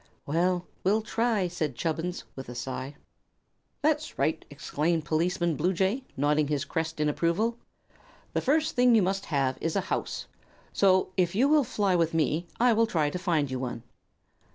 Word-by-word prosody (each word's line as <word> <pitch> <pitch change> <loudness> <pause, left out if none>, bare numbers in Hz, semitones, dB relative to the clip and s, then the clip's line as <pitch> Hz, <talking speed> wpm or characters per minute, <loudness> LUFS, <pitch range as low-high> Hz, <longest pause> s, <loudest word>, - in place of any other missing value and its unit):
"Well, 175 +4 +1 0.2
we'll 210 +3 +2
try," 225 -4 +1
said 155 -6 -3
Chubbins, 165 +4 -2
with 135 -2 -8
a 120 - -7
sigh. 130 +3 -5 0.9
"That's - - 0
right," - - 0
exclaimed 160 +1 -1
Policeman 170 +1 +1
Bluejay, 190 - 0
nodding 150 +2 +2
his 150 0 -1
crest 160 0 -3
in 150 - +2
approval. 180 +10 0 0.7
"The - - +1
first 310 +4 +1
thing 245 -2 +5
you 215 - +5
must 195 +2 -1
have 135 -4 0
is 165 - -1
a - - +3
house; - - -3 0.5
so, 190 -1 +4
if 180 -1 +1
you 255 +6 +4
will 300 0 +5
fly 205 -6 +1
with 165 -1 +1
me, 160 +2 +1
I 245 0 +5
will 225 +1 +3
try 155 -7 +1
to 180 - -4
find 160 -7 0
you 130 - -2
one." 120 -2 -4
170 Hz, 170 wpm, -28 LUFS, 150-200 Hz, 0.9 s, thing